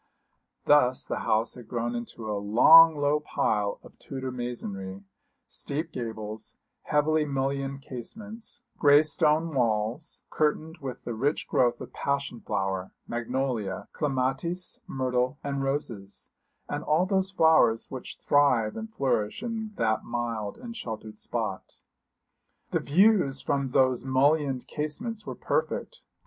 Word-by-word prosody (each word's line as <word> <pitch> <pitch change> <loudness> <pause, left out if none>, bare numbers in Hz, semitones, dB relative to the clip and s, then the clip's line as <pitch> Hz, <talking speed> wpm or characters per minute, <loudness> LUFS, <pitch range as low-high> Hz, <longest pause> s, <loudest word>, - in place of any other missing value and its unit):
Thus 130 -4 +4
the - - -3
house 110 +2 +1
had 120 -3 -11
grown 120 0 -2
into 120 -1 -6
a 105 - -1
long 155 +10 +8
low 145 +1 +2
pile 105 -8 0
of - - -16
Tudor 130 -2 -5
masonry 100 -6 -5 0.4
steep 155 +4 -4
gables, 110 -3 -6 0.3
heavily 150 +1 +2
mullioned 135 -1 -2
casements, 210 - -8 0.2
grey 145 0 +7
stone 155 +1 +2
walls, 120 +4 -1
curtained 155 +2 0
with 135 -3 -6
the 120 - -4
rich 140 +7 -1
growth 120 -1 +2
of - - -8
passion 140 -3 -2
flower, 95 -1 -2
magnolia, 120 -4 -2
clematis, 140 +5 -1
myrtle 130 0 0
and 140 -1 -2
roses 120 -8 -4 0.4
and 145 +1 -3
all 160 +4 +3
those 190 -1 +1
flowers 160 -11 +4
which 130 -2 -7
thrive 125 -7 +3
and 220 0 -6
flourish 130 - -1
in 225 -2 -3
that 110 -1 +1
mild 115 -3 -3
and 240 -1 -8
sheltered 110 - -6
spot. - - -4 0.9
The - - +2
views 180 -4 +3
from 140 -1 0
those 130 -1 +3
mullioned 135 0 +2
casements 210 +10 -4
were - - -4
perfect. - - -2
135 Hz, 130 wpm, -27 LUFS, 115-155 Hz, 0.9 s, long